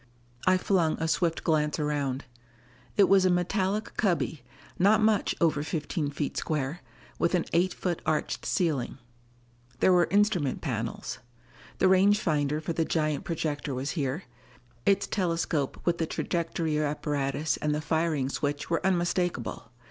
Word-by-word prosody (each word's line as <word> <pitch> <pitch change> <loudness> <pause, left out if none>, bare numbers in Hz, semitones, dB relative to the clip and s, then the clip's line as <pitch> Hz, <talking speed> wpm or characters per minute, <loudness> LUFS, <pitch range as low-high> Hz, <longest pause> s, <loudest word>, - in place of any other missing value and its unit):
I 185 0 +6
flung 180 -4 +1
a 160 - 0
swift 165 0 0
glance 150 -2 +1
around. 145 -3 -1 0.7
It 205 - +7
was 195 -1 +5
a 185 - +4
metallic 190 +4 0
cubby, 175 - 0 0.4
not 205 +4 +5
much 215 -1 +2
over 160 -3 +2
fifteen 150 0 -2
feet 145 0 -3
square, 150 +2 -2 0.4
with 170 - +2
an 175 - +1
eight 180 +2 +3
foot 175 -2 -3
arched 155 -1 -1
ceiling. 150 -9 0 0.8
There 185 - +5
were 175 -1 +4
instrument 200 -9 +2
panels. 115 -6 -4 0.6
The 190 - +4
range 195 +2 +5
finder 150 -5 0
for 160 +2 -3
the 165 - +1
giant 155 -3 -1
projector 150 -4 -2
was 130 +3 -2
here; 145 +1 -2 0.6
its 200 0 +4
telescope 165 -6 -1
with 170 -1 +1
the 165 - 0
trajectory 165 -3 -1
apparatus 145 -1 -1
and 150 0 0
the - - -1
firing 160 -3 0
switch 145 +2 -3
were 165 - +1
unmistakable. 175 - -1
160 Hz, 145 wpm, -28 LUFS, 145-180 Hz, 0.8 s, It